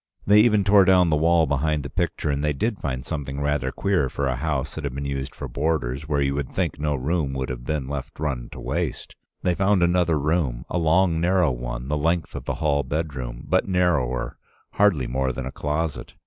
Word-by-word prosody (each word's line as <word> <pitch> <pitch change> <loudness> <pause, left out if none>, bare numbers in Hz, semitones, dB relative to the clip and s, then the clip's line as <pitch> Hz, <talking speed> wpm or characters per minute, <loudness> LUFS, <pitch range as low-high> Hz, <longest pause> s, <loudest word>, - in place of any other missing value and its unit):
They 105 +1 +6
even 105 -2 +4
tore 100 0 +6
down 90 -2 +4
the - - +4
wall 80 +2 +4
behind 75 +1 0
the 70 - -6
picture, 75 - -1
and 70 +1 -1
they 75 0 +1
did 110 - -1
find 65 -2 -3
something 70 -3 -4
rather 70 -2 0
queer 95 -9 0
for 70 - -2
a 65 -1 0
house 75 0 -2
that 80 - -6
had 70 -3 -3
been 70 +1 -4
used 70 0 -4
for - - -6
boarders, 70 -2 -2
where 70 -2 +1
you 70 0 0
would 70 -2 -3
think - - -2
no 75 -1 0
room 70 +1 -1
would 65 0 -3
have 60 -1 -5
been 75 -3 -2
let 70 -2 -4
run 70 -5 -3
to - - -9
waste. - - -3 0.3
They 90 - +2
found 95 0 +2
another 85 -2 +3
room, 75 -5 0
a 90 - +1
long 85 +1 +3
narrow 90 -3 +3
one, - - -5
the 75 +2 0
length 80 -1 0
of - - -6
the - - -2
hall 70 -2 +1
bedroom, 65 -4 -4
but - - +2
narrower, 85 -10 0 0.3
hardly 95 -11 +3
more 65 +2 -1
than 65 0 -5
a 65 - -4
closet. 75 +1 -3
75 Hz, 220 wpm, -24 LUFS, 65-85 Hz, 0.3 s, They